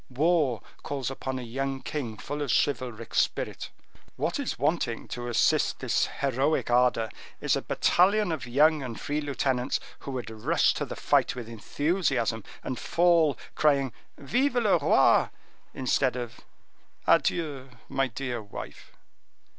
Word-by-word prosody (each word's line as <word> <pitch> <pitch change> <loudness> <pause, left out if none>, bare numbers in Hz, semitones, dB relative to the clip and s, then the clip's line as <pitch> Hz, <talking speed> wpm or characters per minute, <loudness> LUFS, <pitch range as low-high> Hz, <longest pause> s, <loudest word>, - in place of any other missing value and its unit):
War 145 -3 +1 0.2
calls 135 -3 -3
upon 130 0 -4
a 130 - -5
young 135 +3 -3
king 120 -8 -4
full 145 +5 -5
of 145 - -2
chivalric 120 -5 -1
spirit. - - 0 0.5
What - - -1
is - - -2
wanting 140 -4 -1
to 120 0 -5
assist 120 - +2
this - - +1
heroic 140 +1 0
ardor 120 -2 +3 0.3
is - - +1
a - - -1
battalion 200 +2 +3
of 155 -6 -4
young 150 +5 +4
and 120 -4 -6
free 150 +1 -2
lieutenants 135 -3 0 0.2
who - - -8
would 120 -4 -4
rush 110 -1 +2
to - - -3
the - - -6
fight - - +2
with 120 -3 -6
enthusiasm, 120 - -1 0.2
and 130 - -4
fall, 170 -4 +3 0.2
crying: 140 -5 +2 0.2
'Vive 250 - 0
le 215 -8 +3
Roi!' 145 - +4 0.5
instead 130 0 +1
of 120 -2 -6 0.7
'Adieu, 145 -6 +1 0.2
my 135 0 0
dear 125 -1 -4
wife. 100 -1 -10
135 Hz, 140 wpm, -27 LUFS, 120-150 Hz, 0.7 s, young